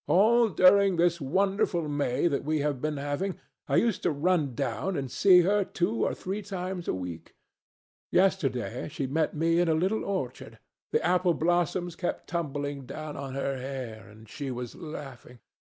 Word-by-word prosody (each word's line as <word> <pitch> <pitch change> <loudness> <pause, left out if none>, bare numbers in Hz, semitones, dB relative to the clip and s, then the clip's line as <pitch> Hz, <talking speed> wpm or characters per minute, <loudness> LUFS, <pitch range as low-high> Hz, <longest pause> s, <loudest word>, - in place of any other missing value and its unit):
All 225 +5 +5
during 190 +2 +5
this 170 0 +2
wonderful 185 +2 +1
May 145 -3 0
that 140 -4 -1
we 155 +2 0
have 145 -3 -1
been 150 -1 -1
having, 145 +7 -2 0.3
I - - +1
used 230 -4 +2
to - - +1
run 150 -3 +1
down 165 +7 -2
and 135 -3 -4
see 185 -3 +6
her 200 +3 +2
two 195 +4 -1
or - - 0
three 195 +3 -4
times 185 -2 -5
a - - +1
week. 90 -3 -7 0.7
Yesterday 135 -11 +1
she 145 -2 -3
met 155 +5 0
me 165 +2 +2
in 175 - +3
a 160 - +3
little 190 +7 0
orchard. 200 -1 -4 0.3
The 455 - 0
apple 180 -1 +3
blossoms 175 +1 0
kept 175 - -3
tumbling 145 -5 -3
down 155 -1 -6
on 135 -1 -6
her 135 0 -2
hair, 125 -6 -6
and 110 +1 -15
she 140 +6 -6
was 125 -2 -5
laughing. 140 -7 -9
160 Hz, 170 wpm, -28 LUFS, 140-185 Hz, 0.7 s, see